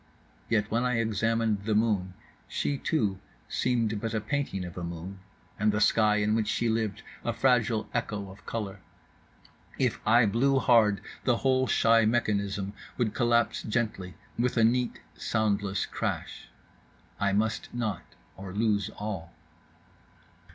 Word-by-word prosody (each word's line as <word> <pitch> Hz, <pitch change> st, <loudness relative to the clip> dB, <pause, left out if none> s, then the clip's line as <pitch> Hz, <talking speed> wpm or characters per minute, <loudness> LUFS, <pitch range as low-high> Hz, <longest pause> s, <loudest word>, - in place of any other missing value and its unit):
—Yet 105 Hz, -2 st, +1 dB
when 115 Hz, +2 st, +1 dB
I 125 Hz, -1 st, +1 dB
examined 115 Hz, -1 st, +1 dB
the 110 Hz, -1 st, +1 dB
moon 100 Hz, -4 st, +1 dB, 0.3 s
she 145 Hz, -, -1 dB
too 105 Hz, -, 0 dB, 0.3 s
seemed 115 Hz, -4 st, 0 dB
but 115 Hz, -1 st, -2 dB
a -, -, +2 dB
painting 110 Hz, -5 st, -2 dB
of 85 Hz, -, -8 dB
a 90 Hz, -, -5 dB
moon 85 Hz, +3 st, -6 dB, 0.4 s
and 105 Hz, +1 st, +3 dB
the 105 Hz, -, 0 dB
sky 105 Hz, 0 st, +4 dB
in 105 Hz, 0 st, +1 dB
which 110 Hz, -1 st, +1 dB
she 120 Hz, -, 0 dB
lived 110 Hz, -3 st, -1 dB, 0.2 s
a -, -, 0 dB
fragile 115 Hz, -4 st, +2 dB
echo 105 Hz, -5 st, -3 dB
of 100 Hz, -, -15 dB
colour. 105 Hz, -4 st, -4 dB, 1.0 s
If -, -, +1 dB
I 120 Hz, +2 st, +5 dB
blew 130 Hz, +6 st, +2 dB
hard 115 Hz, -6 st, +4 dB, 0.2 s
the 120 Hz, -3 st, +2 dB
whole 130 Hz, 0 st, +3 dB
shy 115 Hz, -1 st, +4 dB
mechanism 100 Hz, -3 st, 0 dB, 0.2 s
would 115 Hz, -4 st, 0 dB
collapse 120 Hz, -1 st, +2 dB
gently 105 Hz, -6 st, -2 dB, 0.2 s
with 125 Hz, 0 st, +1 dB
a 115 Hz, -, +5 dB
neat 120 Hz, +2 st, +2 dB
soundless 100 Hz, -2 st, 0 dB
crash. -, -, -4 dB, 0.7 s
I 100 Hz, 0 st, +2 dB
must 110 Hz, +3 st, 0 dB
not, 110 Hz, -6 st, -2 dB, 0.3 s
or 95 Hz, +1 st, -8 dB
lose 105 Hz, -2 st, +1 dB
all. 95 Hz, -6 st, -5 dB
110 Hz, 145 wpm, -28 LUFS, 100-115 Hz, 1.0 s, I